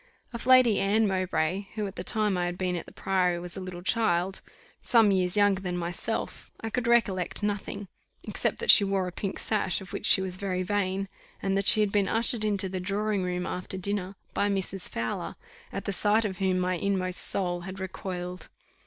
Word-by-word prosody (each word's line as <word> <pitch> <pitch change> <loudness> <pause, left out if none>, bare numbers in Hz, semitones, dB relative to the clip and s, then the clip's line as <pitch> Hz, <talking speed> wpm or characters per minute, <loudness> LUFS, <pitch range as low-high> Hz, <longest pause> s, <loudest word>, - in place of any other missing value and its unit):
Of 235 +1 -5
Lady 255 -4 +6
Anne 210 +3 +2
Mowbray, 185 0 -1
who 215 -2 -2
at 195 0 -6
the - - -5
time 215 -3 0
I 175 -1 0
had 175 0 -4
been 185 -1 -1
at 170 - -5
the - - -11
Priory, 180 -2 0
was 175 0 -7
a 190 - -6
little 180 -1 -7
child, 190 -3 +1 0.4
some 225 -4 +4
years 185 0 +1
younger 205 -2 +3
than 180 -2 -3
myself, 175 +6 -4
I 225 - -5
could 245 0 -1
recollect 205 -6 +1
nothing, 205 -1 -3 0.4
except - - -1
that 470 - +6
she 205 - +7
wore 195 -2 0
a - - -5
pink 195 +2 -4
sash, 210 -4 0
of 190 -2 -11
which - - -2
she - - +7
was 185 -1 -2
very 185 -2 -2
vain, 195 0 -1 0.3
and 195 0 -1
that 195 0 +1
she 215 - +7
had 210 -2 +1
been 200 -1 +2
ushered 225 +1 +2
into 200 -2 0
the 185 0 -4
drawing 205 +2 -1
room 180 0 -2
after 180 +1 -4
dinner 195 0 -3 0.2
by 205 - +1
Mrs. 195 -1 -2
Fowler, 115 0 -4 0.4
at - - -5
the 200 - -1
sight 215 +3 +2
of 190 -3 -4
whom 190 -1 +1
my 180 0 0
inmost 185 -1 0
soul 175 -2 +2
had 190 +2 -8
recoiled. 180 -1 -5
195 Hz, 205 wpm, -27 LUFS, 180-205 Hz, 0.4 s, she